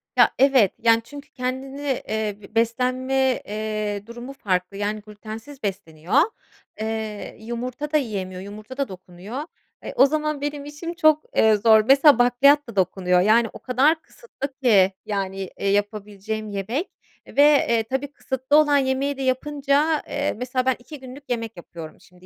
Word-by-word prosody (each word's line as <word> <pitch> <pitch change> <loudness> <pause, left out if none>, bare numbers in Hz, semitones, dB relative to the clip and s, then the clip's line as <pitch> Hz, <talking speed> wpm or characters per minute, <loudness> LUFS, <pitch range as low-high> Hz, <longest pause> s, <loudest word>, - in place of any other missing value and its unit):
Ya, - - +5
evet, 265 -7 +5
yani, 230 0 +4
çünkü 285 +4 -11
kendini 260 +2 -4 0.3
eee, 215 -2 -2 0.2
beslenme, 255 +3 +1
eee, 210 -1 -3
durumu 240 +3 -8
farklı, 190 -5 -2
yani, 210 +1 -2
glütensiz 220 +6 -10
besleniyor. 180 - 0 0.6
Eee, 220 -1 -4
yumurta 245 +6 -5
da 305 - +4
yiyemiyor, 190 -8 -4
yumurta 215 +6 -10
da 275 - 0
dokunuyor. 185 +7 -8 0.4
E, - - -6
o 270 - +6
zaman 305 0 -1
benim 290 -1 -4
işim 295 +4 -6
çok, 310 -2 +3
eee, 220 -1 +5
zor. 220 +1 +5
Mesela, 275 -1 +6
bakliyat 270 +3 +4
da 215 - -9
dokunuyor. 180 -1 +2
Yani, 225 +4 +4
o - - -10
kadar 280 +6 +2
kısıtlı 285 - -8
ki, 195 -5 +5
yani, 195 -2 -3
eee, - - -1
yapabileceğim 210 +1 -2
yemek 220 - -3 0.4
ve, 285 - +3 0.3
eee, 230 -1 +2
tabii 265 +5 -3
kısıtlı 265 +1 0
olan 295 -2 +5
yemeği 270 +1 0
de - - -5
yapınca, 285 +3 +1
eee, 290 0 -1
mesela, 250 +2 -2
ben 260 -1 +2
2 290 +4 -11
günlük 260 +2 -11
yemek 230 -4 -3
yapıyorum 165 -2 -10
şimdi. 180 0 -20
240 Hz, 155 wpm, -23 LUFS, 205-275 Hz, 0.6 s, o